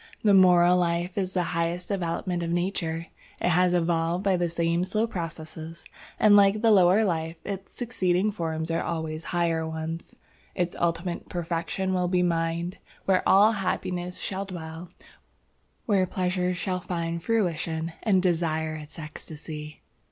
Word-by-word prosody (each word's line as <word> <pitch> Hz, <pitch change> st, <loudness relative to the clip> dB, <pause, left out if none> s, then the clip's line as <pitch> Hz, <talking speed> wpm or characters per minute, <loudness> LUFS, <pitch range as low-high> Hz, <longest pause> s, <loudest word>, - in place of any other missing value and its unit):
"The 205 Hz, -2 st, +5 dB
moral 180 Hz, -2 st, +6 dB
life 175 Hz, +1 st, 0 dB
is 190 Hz, -2 st, -2 dB
the 180 Hz, -, +2 dB
highest 170 Hz, +2 st, -1 dB
development 175 Hz, -2 st, -2 dB
of 170 Hz, -, -2 dB
Nature. 170 Hz, -2 st, -1 dB, 0.3 s
It 180 Hz, -, +1 dB
is 180 Hz, 0 st, +3 dB
evolved 170 Hz, +1 st, +1 dB
by 195 Hz, -2 st, +3 dB
the 175 Hz, -1 st, 0 dB
same 170 Hz, +1 st, 0 dB
slow 215 Hz, +4 st, +1 dB
processes, 165 Hz, -4 st, -7 dB, 0.3 s
and 210 Hz, -1 st, +6 dB
like 200 Hz, +2 st, +5 dB
the 225 Hz, -, +6 dB
lower 195 Hz, +2 st, +5 dB
life, 165 Hz, -3 st, -1 dB
its 195 Hz, -1 st, -5 dB
succeeding 195 Hz, -4 st, 0 dB
forms 160 Hz, -4 st, -2 dB
are 165 Hz, +1 st, 0 dB
always 160 Hz, -1 st, -3 dB
higher 170 Hz, -2 st, 0 dB
ones. 160 Hz, +1 st, -5 dB, 0.4 s
Its 175 Hz, -1 st, -1 dB
ultimate 170 Hz, +1 st, -1 dB
perfection 175 Hz, +2 st, -2 dB
will 180 Hz, -1 st, +1 dB
be 180 Hz, 0 st, +2 dB
mind, 170 Hz, +1 st, -1 dB, 0.3 s
where 190 Hz, -1 st, +3 dB
all 205 Hz, +3 st, +7 dB
happiness 180 Hz, -3 st, -2 dB
shall 195 Hz, 0 st, -3 dB
dwell, 165 Hz, -2 st, -8 dB, 1.0 s
where 195 Hz, -4 st, +2 dB
pleasure 180 Hz, 0 st, 0 dB
shall 185 Hz, +1 st, -2 dB
find 170 Hz, -1 st, -3 dB
fruition, 165 Hz, -5 st, -1 dB
and 190 Hz, -5 st, +3 dB
desire 160 Hz, -3 st, 0 dB
its 155 Hz, +1 st, -9 dB
ecstasy. 150 Hz, -1 st, -8 dB
175 Hz, 145 wpm, -26 LUFS, 165-185 Hz, 1.0 s, all